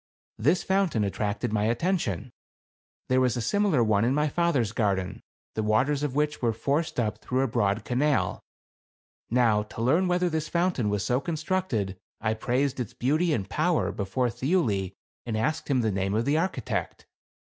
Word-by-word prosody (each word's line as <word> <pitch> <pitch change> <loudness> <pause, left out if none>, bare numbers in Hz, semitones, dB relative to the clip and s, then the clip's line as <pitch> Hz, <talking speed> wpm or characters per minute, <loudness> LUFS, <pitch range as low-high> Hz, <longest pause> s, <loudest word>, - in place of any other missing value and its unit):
This 155 +11 +2
fountain 190 - +1
attracted 105 +3 -2
my 105 -1 +1
attention. 120 - -1 0.8
There 130 0 +3
was 125 -1 +2
a - - -1
fimilar 160 - +2
one 105 -1 +3
in 125 +4 +2
my 150 0 +2
father's 145 - +1
garden, 100 -5 -1 0.3
the 110 - -1
waters 125 +7 +2
of 145 -3 -2
which 150 0 0
were 115 -2 +2
forced 140 +6 -1
up 110 -3 -1
through 130 +1 -1
a 135 - +2
broad 110 -3 0
canal. 140 +4 +1 0.9
Now 115 -4 +3
to 105 - -9
learn 160 +10 +3
whether 180 0 +2
this 160 -2 -2
fount 175 -2 +1
ain 105 -4 +1
was 105 -1 -1
so 125 +1 +2
constructed, 155 - -2 0.2
I 110 +1 0
praised 130 +4 -1
its 120 -4 -4
beauty 155 +7 +1
and 100 -9 -1
power 160 - +1
before 115 +6 -1
Thiuli 115 - 0 0.3
and 110 -2 -1
asked 155 +8 -1
him 130 -3 +2
the 110 -2 +1
name 95 +1 -1
of 115 +2 +1
the 140 +2 +2
architect. 160 - -2
125 Hz, 175 wpm, -27 LUFS, 110-155 Hz, 0.9 s, There